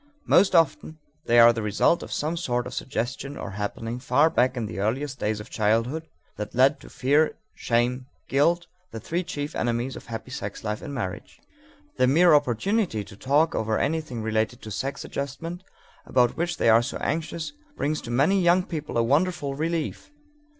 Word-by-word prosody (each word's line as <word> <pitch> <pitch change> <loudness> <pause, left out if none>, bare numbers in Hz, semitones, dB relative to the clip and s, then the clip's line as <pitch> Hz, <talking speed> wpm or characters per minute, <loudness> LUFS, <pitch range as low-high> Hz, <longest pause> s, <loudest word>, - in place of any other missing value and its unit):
Most 190 0 +4
often 160 -1 +2 0.3
they 120 - +4
are 120 0 +8
the 115 - -3
result 105 - +2
of - - -8
some 155 +3 -1
sort 125 -8 -1
of - - -7
suggestion 135 +3 -4
or 95 - -6
happening 110 +4 -4
far 145 +6 +3
back 125 -2 +2
in 115 - -1
the 100 -2 -6
earliest 130 +7 -2
days 105 0 -1
of 105 - -10
childhood 115 +9 0 0.3
that 105 +2 -6
led 130 +2 +4
to - - -13
fear, 145 +4 +2 0.2
shame, 125 +2 0
or - - -41
guilt, 170 +6 +2 0.2
the 115 - -7
three 170 - -2
chief 145 -3 -5
enemies 120 +2 -1
of - - -10
happy 115 +2 -7
sex 105 -6 -6
life 105 -1 -3
in 145 - -7
marriage. 95 -10 -5 0.6
The 125 - +4
mere 165 +5 +5
opportunity 145 - +1
to 100 0 -13
talk 145 +8 +2
over 110 0 0
anything 150 -8 -2
related 110 +2 -1
to 110 - -7
sex 135 +6 -4
adjustment 165 +6 -5 0.4
about 125 -2 +3
which 170 0 -2
they - - +1
are 115 +1 +6 0.2
anxious 165 - -3 0.2
brings 150 +1 -1
to 120 - -9
many 145 +11 +3
young 175 +1 +4
people 155 -8 -5
a 115 - +3
wonderful 145 +2 +1
relief. 160 - -3
130 Hz, 180 wpm, -25 LUFS, 115-160 Hz, 0.6 s, are